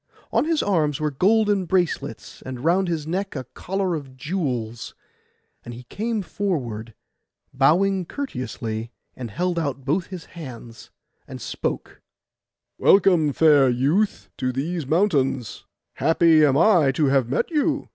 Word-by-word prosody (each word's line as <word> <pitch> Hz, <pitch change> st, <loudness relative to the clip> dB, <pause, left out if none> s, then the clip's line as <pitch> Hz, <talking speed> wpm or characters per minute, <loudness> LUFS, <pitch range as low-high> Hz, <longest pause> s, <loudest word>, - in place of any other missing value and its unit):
On -, -, +2 dB
his 325 Hz, -1 st, +1 dB
arms 155 Hz, -8 st, +1 dB
were 155 Hz, -1 st, -1 dB
golden 205 Hz, +5 st, +2 dB
bracelets, 170 Hz, -5 st, -2 dB
and 130 Hz, -1 st, -7 dB
round 185 Hz, +3 st, +3 dB
his 160 Hz, -3 st, -2 dB
neck 190 Hz, +4 st, -3 dB
a 130 Hz, -, -3 dB
collar 190 Hz, -1 st, -2 dB
of 135 Hz, -5 st, -6 dB
jewels; 130 Hz, -, -3 dB, 0.7 s
and 120 Hz, -, -8 dB
he 125 Hz, -, -10 dB
came 220 Hz, 0 st, -2 dB
forward, 120 Hz, -, -3 dB, 0.6 s
bowing 180 Hz, +8 st, +2 dB
courteously, 115 Hz, -, -5 dB, 0.3 s
and 125 Hz, -3 st, -6 dB
held 175 Hz, -, -1 dB
out 140 Hz, -4 st, -3 dB
both 165 Hz, +6 st, 0 dB
his 185 Hz, -3 st, -8 dB
hands, 120 Hz, -8 st, -10 dB, 0.4 s
and -, -, -8 dB
spoke— -, -, -5 dB, 0.8 s
'Welcome, 180 Hz, -6 st, +4 dB
fair 145 Hz, -3 st, +5 dB
youth, 145 Hz, -, 0 dB
to 130 Hz, -, -1 dB
these 150 Hz, +3 st, -3 dB
mountains; 140 Hz, -, 0 dB, 0.3 s
happy 160 Hz, +1 st, +4 dB
am 140 Hz, -2 st, +4 dB
I 170 Hz, -6 st, +5 dB
to 150 Hz, +3 st, +1 dB
have 135 Hz, -3 st, +2 dB
met 135 Hz, -, -1 dB
you! 300 Hz, -1 st, 0 dB
155 Hz, 135 wpm, -23 LUFS, 130-190 Hz, 0.8 s, fair